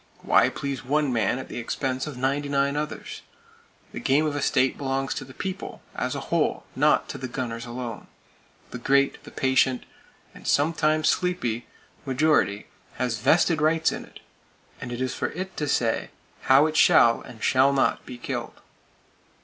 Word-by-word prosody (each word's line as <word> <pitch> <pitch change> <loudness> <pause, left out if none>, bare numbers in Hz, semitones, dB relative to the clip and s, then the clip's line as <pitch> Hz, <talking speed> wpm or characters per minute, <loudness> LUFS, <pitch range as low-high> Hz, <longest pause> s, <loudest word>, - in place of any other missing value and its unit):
Why - - +4
please 140 -2 -4
one 145 0 +1
man 115 0 +1
at 130 - -7
the - - -6
expense 130 +3 -2
of 145 -4 -7
ninety 140 +3 -1
nine 140 0 +1
others? 150 +1 -5 0.7
The - - -6
game 145 +4 +2
of 150 -1 -1
a 145 - -2
state 130 -1 +2
belongs 135 -1 -2
to 135 - -5
The 130 - -13
People 190 -1 -5
as - - -2
a - - -2
whole, - - +1
not - - +3
to - - -6
the 130 - -4
gunners 120 -2 -5
alone. 120 -2 -6 0.6
The 125 - -6
great, 140 +2 +2 0.2
patient,—and 130 -1 -2
sometimes 155 +1 +2
sleepy,—majority 130 - 0 0.3
has 125 -4 -2
vested 160 +5 +3
rights 160 +1 +3
in - - -5
it, - - -15 0.6
and 120 - -6
it 120 +1 -4
is 130 - -1
for - - -2
it 185 +2 -6
to 150 - -1
say 115 -5 0 0.4
how 135 +3 +7
it 155 0 -2
shall 115 -6 +5
and 110 -3 -11
shall 135 +1 +4
not 135 -1 +1
be 125 - -9
killed. - - -5
135 Hz, 165 wpm, -25 LUFS, 125-150 Hz, 0.7 s, how